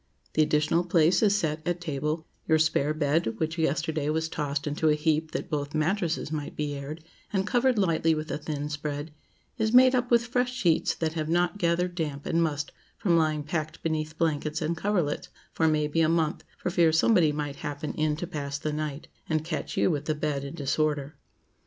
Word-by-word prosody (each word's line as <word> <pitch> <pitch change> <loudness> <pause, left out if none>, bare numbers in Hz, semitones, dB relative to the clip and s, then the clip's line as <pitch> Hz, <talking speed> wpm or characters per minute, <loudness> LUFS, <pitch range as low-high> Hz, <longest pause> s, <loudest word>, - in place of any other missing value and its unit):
The 155 - +3
additional 155 +3 +2
place 170 0 +3
is 205 -2 +4
set 160 -6 -1
at 175 0 -1
table; 155 0 -2 0.2
your 160 - +5
spare 155 -2 +2
bed, 150 -5 +1
which 160 +4 -2
yesterday 155 -1 0
was 160 +1 0
tossed 145 -2 -2
into 150 +1 +1
a 150 - +4
heap 155 +1 +1
that - - -4
both 145 0 -3
mattresses 170 0 0
might 150 -2 -4
be 150 -1 -2
aired, 145 +3 -6 0.3
and 195 -1 0
covered 245 +3 +2
lightly 165 -4 +2
with 155 +1 -4
a - - -2
thin 150 -1 -3
spread, 145 +1 -4 0.5
is 220 +1 +1
made 255 +1 +8
up 245 -1 +1
with 235 -1 +4
fresh 245 0 0
sheets 180 -11 +1
that 160 -1 -2
have 155 -1 -2
not 175 +3 +1
gathered 175 +1 +1
damp 150 -5 -3
and 165 - +1
must 145 -3 -1 0.3
from 175 -4 +2
lying 155 -2 +2
packed 155 +1 -4
beneath 155 -1 -2
blankets 155 -1 0
and 160 +1 -1
coverlets 175 -4 -1 0.2
for 160 - +2
may 155 -1 +2
be 165 +2 +1
a 160 - +4
month, 165 -1 0
for 180 - -2
fear 170 -3 +4
somebody 160 -1 +4
might 145 -1 -4
happen 145 +1 -4
in 155 -1 0
to 170 - -4
pass 145 -4 -4
the 150 +1 -3
night, 150 -1 -4 0.2
and 155 -1 0
catch 165 -2 -4
you - - +3
with 145 -3 -2
the 155 - 0
bed 150 -2 -2
in 140 +3 -6
disorder. 145 0 -1
155 Hz, 200 wpm, -27 LUFS, 150-170 Hz, 0.5 s, made